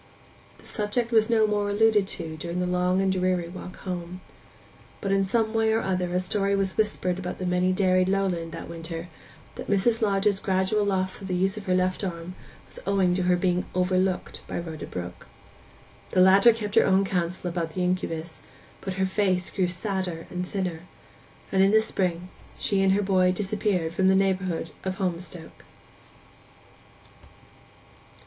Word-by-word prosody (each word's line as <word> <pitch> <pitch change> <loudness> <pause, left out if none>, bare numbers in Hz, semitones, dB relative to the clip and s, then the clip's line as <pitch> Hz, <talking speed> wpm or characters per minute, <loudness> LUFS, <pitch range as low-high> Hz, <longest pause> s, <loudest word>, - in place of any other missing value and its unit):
The - - -19
subject 230 +3 -1
was 220 -1 +4
no 225 -2 +4
more 205 -1 0
alluded 210 -1 +3
to 165 -5 -3
during 170 +3 -4
the 180 - 0
long 180 +1 +1
and 195 0 +2
dreary 185 -2 0
walk 185 +1 -8
home. 180 -1 -5 0.8
But 195 - -2
in 195 0 +3
some 220 +3 +1
way 225 0 +2
or 225 - +2
other 180 -2 -1
a - - +3
story 200 +2 0
was 195 -1 0
whispered 190 -4 0
about 180 -1 -5
the 185 - -4
many 180 +1 +2
dairied 185 -1 +2
lowland 185 -4 0
that - - -7
winter 165 +1 -6 0.4
that - - -8
Mrs. 220 +4 +2
Lodge's 200 -1 +2
gradual 190 +2 +1
loss 190 0 -1
of 195 - -6
the 185 - -1
use 190 +3 +1
of 210 -2 -8
her 185 - +3
left 185 +2 0
arm 175 -1 -4 0.3
was - - -10
owing 195 -3 +3
to 185 - 0
her 180 0 +3
being 180 0 0
'overlooked' 185 0 0
by - - -4
Rhoda 160 -3 -6
Brook. 90 -1 -7 0.8
The - - +1
latter 195 +5 +7
kept 210 -2 -5
her - - +5
own 195 +1 +4
counsel 180 -1 -2
about 165 -2 -3
the 185 - 0
incubus, 165 -2 -2 0.4
but 190 -1 -4
her 190 0 +1
face 190 -2 0
grew 185 -2 +1
sadder 180 -2 -3
and 180 0 -3
thinner; 185 -5 -3 0.7
and 190 - +3
in 195 - +5
the 220 +2 +5
spring 180 -5 -1 0.3
she 200 -3 +1
and 190 0 +4
her 205 +1 +1
boy 185 -2 +3
disappeared 195 -3 -1
from 190 +2 +2
the 190 - +5
neighbourhood 185 -4 0
of 190 0 -2
Holmstoke. 175 -3 -4
185 Hz, 175 wpm, -26 LUFS, 180-195 Hz, 0.8 s, latter